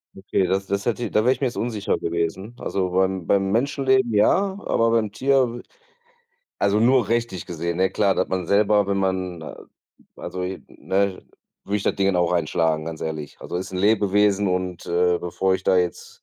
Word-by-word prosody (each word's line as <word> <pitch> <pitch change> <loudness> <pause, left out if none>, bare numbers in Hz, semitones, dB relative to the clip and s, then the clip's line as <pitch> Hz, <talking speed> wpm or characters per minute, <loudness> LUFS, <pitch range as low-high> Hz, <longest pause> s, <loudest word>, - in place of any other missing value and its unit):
Okay, 95 -1 -1
das 95 +1 -1
das 100 +1 -2
hätte 120 -2 -1
da 110 +2 +1
wär 125 - +5
ich 135 - -2
mir 130 - +2
jetzt 120 - -6
unsicher 110 -4 -1
gewesen. 85 +7 -3
Also 95 -2 -2
beim 95 -1 0
beim 95 -1 +1
Menschenleben 130 0 +1
ja, 190 - +3
aber 115 0 +1
beim 110 -3 +1
Tier 130 0 +1 1.0
also 100 +1 +2
nur 125 -2 +3
rechtlich 115 -6 -1
gesehen, 85 0 -3
ne? 95 0 +3
Klar, 100 -1 +2
dass - - 0
man 90 -2 -2
selber, 105 0 +3
wenn 100 0 0
man 95 -3 -2 0.7
also, 90 - -6
ne 95 +1 -2 0.4
würde 105 - -1
ich 100 - -3
das - - +1
Dingen 100 0 +2
dann 90 - +3
auch 85 - 0
einschlagen, 80 -2 0
ganz 80 -1 -6
ehrlich. 75 -2 -5
Also, - - -5
ist 95 +1 -5
'n 90 - -3
Lebewesen 105 0 +3
und, 90 -1 -2
äh, 90 0 +2
bevor 95 +2 0
ich 95 - -4
da 95 - +3
jetzt 90 -1 -4
95 Hz, 190 wpm, -23 LUFS, 90-110 Hz, 1.0 s, wär